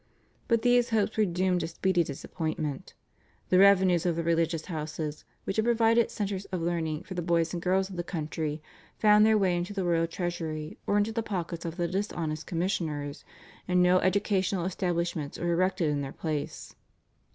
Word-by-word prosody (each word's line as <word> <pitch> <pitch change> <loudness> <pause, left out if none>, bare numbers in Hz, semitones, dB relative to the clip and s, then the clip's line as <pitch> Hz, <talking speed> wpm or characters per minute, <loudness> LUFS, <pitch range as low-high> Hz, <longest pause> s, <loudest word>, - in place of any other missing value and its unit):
But 230 -1 +2
these 245 -1 +4
hopes 220 -2 +1
were 215 - +3
doomed 180 0 +1
to 160 - -2
speedy 175 +1 +1
disappointment. 150 0 -4 0.5
The 185 - +5
revenues 190 -3 +5
of 175 -2 +1
the 170 - -1
religious 165 -1 +1
houses, 155 -2 -5 0.2
which 195 - -3
had 220 - +2
provided 230 0 +3
centres 200 -2 -3
of 185 - -4
learning 165 -2 -2
for 190 - -8
the 175 - -2
boys 170 -1 +1
and 175 - -3
girls 190 +2 +1
of 190 -2 -9
the 175 - -1
country, 155 -2 -4 0.3
found 210 0 +6
their 220 -1 +5
way 190 -3 +2
into 175 +3 -3
the 195 -2 -2
royal 165 -1 +2
treasury 165 -3 -4
or 205 - +2
into 205 +2 +1
the 230 +1 -1
pockets 175 -6 -4
of 165 +1 -5
the 175 -1 0
dishonest 170 -5 -3
commissioners, 160 -5 -2 0.4
and 180 0 +3
no 180 +1 +5
educational 190 -1 +1
establishments 170 -5 -2
were 170 0 0
erected 185 -2 +1
in 145 -1 -1
their 135 -1 -5
place. 155 -3 -4
175 Hz, 180 wpm, -28 LUFS, 165-195 Hz, 0.5 s, found